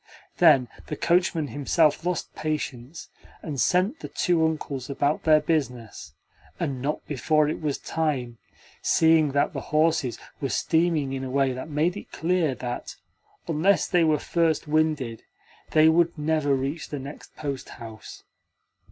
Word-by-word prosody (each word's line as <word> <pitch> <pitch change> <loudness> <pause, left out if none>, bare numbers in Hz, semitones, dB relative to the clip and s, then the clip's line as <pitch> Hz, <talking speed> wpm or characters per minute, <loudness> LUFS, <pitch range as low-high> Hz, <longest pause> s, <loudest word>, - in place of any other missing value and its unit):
Then 150 -8 +6 0.2
the 150 - -4
coachman 170 -2 +1
himself 150 +2 +2
lost 180 -1 -2
patience, 150 -2 -4 0.3
and 140 -6 -3
sent 185 - +2
the - - -6
two 170 -2 +1
Uncles 150 -4 -2
about 140 +2 0
their 155 -1 +6
business 125 - -3 0.5
and 135 -3 -2
not 145 +3 -3
before 150 +2 +2
it 155 - -3
was 150 -3 -1
time, 135 -8 -2 0.4
seeing 160 -3 +4
that 140 - +1
the - - -4
horses 155 -5 +1 0.2
were 135 - -1
steaming 160 -4 +1
in 135 0 -3
a 130 - -4
way 135 0 +1
that 130 +5 -7
made 155 +4 +1
it - - -9
clear 165 -4 0
that, 120 -1 -5 0.5
unless 170 +5 +2
they 175 -2 +3
were 155 -1 +3
first 165 0 0
winded, 150 -7 0 0.5
they 155 0 +5
would 170 +1 +3
never 150 -2 +1
reach 135 +5 -3
the 145 - -4
next 140 +2 -10
posthouse. 120 -6 -7
150 Hz, 145 wpm, -25 LUFS, 135-160 Hz, 0.5 s, Then